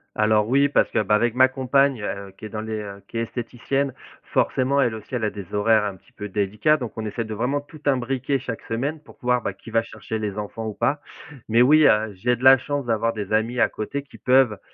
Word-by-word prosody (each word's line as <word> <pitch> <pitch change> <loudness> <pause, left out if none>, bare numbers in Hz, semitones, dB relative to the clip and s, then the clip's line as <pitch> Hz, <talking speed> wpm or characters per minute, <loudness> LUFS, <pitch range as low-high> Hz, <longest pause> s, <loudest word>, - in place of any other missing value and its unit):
Alors 105 0 +3
oui, 140 +4 +3
parce - - +2
que, - - 0
bah, 105 +1 +1
avec 115 +2 +2
ma 130 +1 +6
compagne, 135 -1 +1
heu, 100 -1 -5
qui - - -12
est 110 - -6
dans 110 - -4
les, 110 -1 -4
heu, 100 -1 -9
qui - - -9
est 115 - +1
esthéticienne, 125 +3 -3 0.3
forcément 140 +2 +1
elle 120 -3 +1
aussi 110 +4 -9
elle 120 -3 -1
a 105 - +1
des 100 -2 -9
horaires 105 +1 +3
un 100 -2 -3
petit - - -26
peu 105 - -7
délicat, 105 +9 +1
donc 125 -6 -6
on 110 -1 -4
essaie 115 +2 -3
de 110 - -7
vraiment 135 +6 -1
tout 150 +1 -15
imbriquer 135 +1 0
chaque 115 -3 -6
semaine 140 +7 -3
pour 150 - -17
pouvoir, 125 -1 +1
ben, 100 -4 -4
qui 110 +3 -13
va 115 0 +2
chercher 110 0 -6
les 105 -2 -4
enfants 110 +2 -5
ou 110 - -4
pas, 145 +1 0 0.5
mais 115 +2 +5
oui, 150 +3 +6
heu, 105 0 +3
j'ai 120 +6 0
de 125 - -7
la 130 0 +9
chance 145 0 -3
d'avoir 115 0 0
des 105 -1 -5
amis 115 +3 +1
à - - +3
côté 125 +6 -4
qui 140 - -16
peuvent, 125 -5 +3
115 Hz, 250 wpm, -23 LUFS, 105-130 Hz, 0.5 s, la